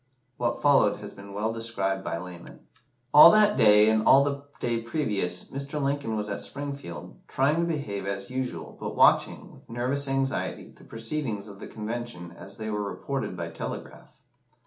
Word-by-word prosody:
What 120 -1 -2
followed 140 -8 +5
has 105 -1 -9
been 100 0 -12
well 105 +3 -2
described 115 -4 -2
by - - -3
Lamon. 85 0 -10 0.5
"All 150 +3 +11
that 210 +1 +5
day, 105 -3 +6
and 110 0 +3
all 135 +1 +7
the 140 0 -3
day 120 -1 -1
previous, 105 - -1
Mr. 140 +2 -4
Lincoln 140 -5 -1
was 105 0 -2
at 100 - -3
Springfield, 140 -10 -7
trying 140 +4 +1
to 170 - +2
behave 105 - -3
as 100 +2 -4
usual, 130 0 -4
but - - -5
watching, - - +3
with - - -19
nervous 130 +4 -1
anxiety, 135 0 -2
the - - -18
proceedings 115 -3 -3
of 100 -1 -11
the - - -8
Convention 110 -5 -6
as 95 +3 -12
they 110 0 -4
were 105 0 -2
reported 105 0 -4
by 85 -1 -4
telegraph. 80 - -8
115 Hz, 170 wpm, -27 LUFS, 100-140 Hz, 0.5 s, All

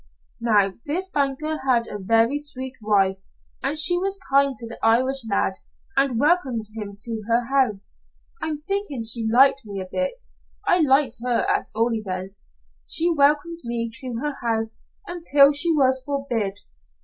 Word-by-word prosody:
"Now 210 -4 +3
this 360 +6 -1
banker 300 -1 -1
had 255 -4 +1
a 205 - -6
very 225 +7 +2
sweet 260 -3 -2
wife, 195 -2 +1 0.4
and 280 +3 -1
she 350 +3 +5
was 390 +1 0
kind 275 0 +3
to 230 - -7
the 230 - -9
Irish 255 +4 +3
lad 200 - 0 0.4
and 270 -4 +1
welcomed 285 -7 +1
him 205 -2 -6
to 225 +1 -4
her 235 +1 +2
house. 210 - 0 0.4
I'm 300 -1 -4
thinking 395 - -2
she 225 0 +1
liked 270 +3 +5
me 200 -2 -7
a 190 - -5
bit 185 - -3 0.4
I 360 - +3
liked 270 -4 +3
her 245 -2 +1
at - - 0
all 230 +2 +1
events. 190 -2 -5 0.4
She 340 +1 +2
welcomed 300 +3 +2
me 235 -1 -3
to 255 -4 -3
her 295 -1 -2
house 225 -2 -2 0.3
until 295 -5 +4
she 295 +4 +2
was 265 -4 +3
forbid. 240 -8 -3
255 Hz, 160 wpm, -23 LUFS, 225-290 Hz, 0.4 s, she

